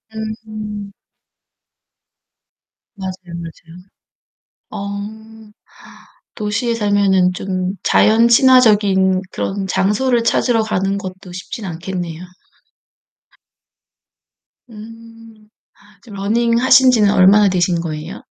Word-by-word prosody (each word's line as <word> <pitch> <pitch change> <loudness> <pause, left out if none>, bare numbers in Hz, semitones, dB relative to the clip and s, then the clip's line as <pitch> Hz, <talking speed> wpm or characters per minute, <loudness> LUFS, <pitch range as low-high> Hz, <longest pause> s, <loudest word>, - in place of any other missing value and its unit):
음. 215 -2 -7 2.0
맞아요, 190 -1 -5
맞아요. 170 0 -11 0.9
어. 215 +2 -8 0.8
도시에 215 +3 -2
살면은 200 -4 +2
좀 185 0 -4
자연 225 +2 +3
친화적인 210 -7 +4
그런 195 0 -4
장소를 230 +6 0
찾으러 230 0 +1
가는 195 -2 -1
것도 185 -1 -9
쉽진 185 +4 -8
않겠네요. 175 -1 -6 2.5
음. 225 0 -14 0.3
아 205 -1 -23
지금 215 -3 -13
러닝 230 +4 0
하신지는 255 -5 +4
얼마나 200 +2 +5
되신 180 -2 0
거예요? 160 +4 -6
205 Hz, 185 characters per minute, -17 LUFS, 190-225 Hz, 2.5 s, 얼마나